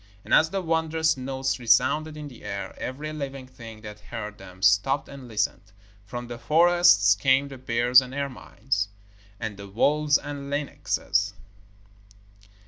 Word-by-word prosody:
And - - -3
as 160 - +6
the 195 +1 -3
wondrous 160 -1 +1
notes 130 0 -2
resounded 150 +6 +2
in 150 -1 -7
the 125 -5 -13
air, 100 -1 -5
every 150 +4 -5
living 135 -3 -6
thing 115 -4 -12
that 105 -1 -9
heard 105 -1 -7
them 95 -1 -12
stopped 100 +8 +3
and 140 -2 -10
listened. 110 -3 -2 0.3
From 120 +4 -6
the 120 0 -7
forests 160 - +5
came 135 +6 +2
the 135 -2 -10
bears 125 +1 +4
and 130 -1 -8
ermines, 130 -6 -3 0.5
and 110 -3 -5
the 100 0 -9
wolves 145 +8 +2
and 140 -1 -7
lynxes. 145 0 -1
130 Hz, 145 wpm, -25 LUFS, 110-145 Hz, 0.5 s, as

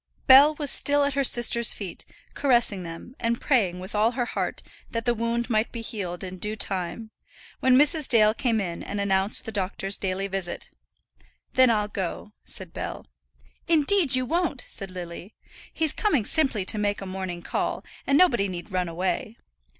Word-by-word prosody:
Bell 280 +4 +7
was 290 -2 -1
still 285 0 +5
at 280 0 0
her 275 0 0
sister's 235 -2 +4
feet, 195 -4 -8 0.3
caressing 240 -8 +3
them, 170 +8 -9
and 235 0 -1
praying 200 -11 +1
with 185 +3 -9
all 215 +3 +2
her 245 -1 -1
heart - - -4 0.3
that 230 -1 -4
that 240 - +2
wound 235 +1 -2
might 220 -2 0
be 230 - -6
healed 185 -6 -5
in 185 -1 -7
due 210 +3 -3
time, 195 +2 -4 0.5
when 255 -1 +4
Mrs. 295 +1 +4
Dale 215 -3 +5
came 230 -2 0
in 175 -4 -4
and 205 - -5
announced 195 0 +1
the 225 - -5
doctor's 195 -1 -2
daily 195 0 -2
visit. 190 -3 -5 0.8
"Then 255 -1 +5
I'll 210 -2 +1
go," 200 +1 -5
said 185 -4 -3
Bell. - - -6 0.6
"Indeed 325 -2 +3
you 255 0 0
won't," 325 -2 -2
said 195 - -7
Lily. 180 +2 -9 0.4
"He's 320 -2 0
coming 300 - 0
simply 265 - 0
to 215 - +3
make 205 0 -1
a 195 - -7
morning 185 -2 -6
call, - - -3 0.2
and 280 - +3
nobody 240 - +3
need 180 +1 -7
run 180 -2 -1
away. 185 +6 -3
215 Hz, 175 wpm, -25 LUFS, 190-255 Hz, 0.8 s, Bell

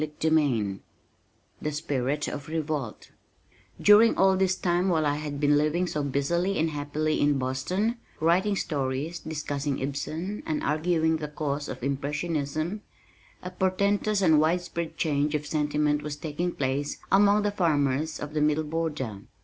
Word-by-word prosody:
CHAPTER 155 +1 -1
XXXII 120 -11 +1 0.8
The 150 - -2
Spirit 145 -1 -1
of 140 -1 -5
Revolt 155 -7 -4 0.7
During 210 +2 +6
all 190 0 +5
this 190 -1 +2
time 180 +1 +1
while 160 -3 +2
I 145 0 +1
had 150 -1 -5
been 145 0 +4
living 155 +4 +1
so 150 -4 -2
busily 170 +8 0
and 160 +1 +1
happily 150 +1 -1
in 145 -1 +3
Boston, 160 - -1 0.2
writing 180 +6 +2
stories, 145 0 -2
discussing 145 -3 -3
Ibsen 155 +8 -4
and 155 -1 -1
arguing 160 +2 +1
the 155 -1 -4
cause 145 -1 -3
of 125 -1 -7
Impressionism, 150 +5 -2 0.6
a 180 - -5
portentous 200 +2 +1
and 160 -4 +5
widespread 170 +1 -1
change 150 -1 +1
of 150 0 -2
sentiment 150 -1 0
was 150 -1 -4
taking 160 +4 -3
place 140 +1 -2
among 205 +1 +5
the 205 - +1
farmers 155 -5 +1
of 150 0 -6
the 155 - 0
Middle 150 +1 +2
Border. 150 -9 -3
155 Hz, 150 wpm, -27 LUFS, 145-175 Hz, 0.8 s, During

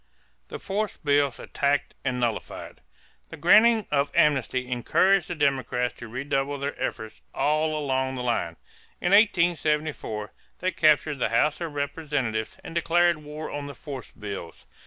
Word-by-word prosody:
=The - - -6
Force 205 +2 -3
Bills 145 -3 +1
Attacked 145 0 -1
and 125 -1 -1
Nullified.= 120 -3 -4 0.5
The - - -9
granting 220 +5 +5
of 140 -1 +2
amnesty 130 -3 +2
encouraged 185 +10 +2
the 175 - -4
Democrats 135 -4 0
to 120 - -8
redouble 135 +3 -2
their 140 +1 -3
efforts 110 -1 -4
all 155 +1 +1
along 130 -2 -1
the 125 - -4
line. 100 -9 -1 0.4
In 175 - 0
1874 155 - +2 0.2
they 185 +1 -1
captured 155 -3 +3
the 120 - +1
House 145 +9 +1
of 160 -3 -4
Representatives 140 -6 -2
and - - -8
declared 170 0 +3
war 150 +1 -7
on 145 -1 -5
the 140 - -8
"force 135 -6 -8
bills." 100 -5 -8
145 Hz, 145 wpm, -26 LUFS, 125-160 Hz, 0.5 s, granting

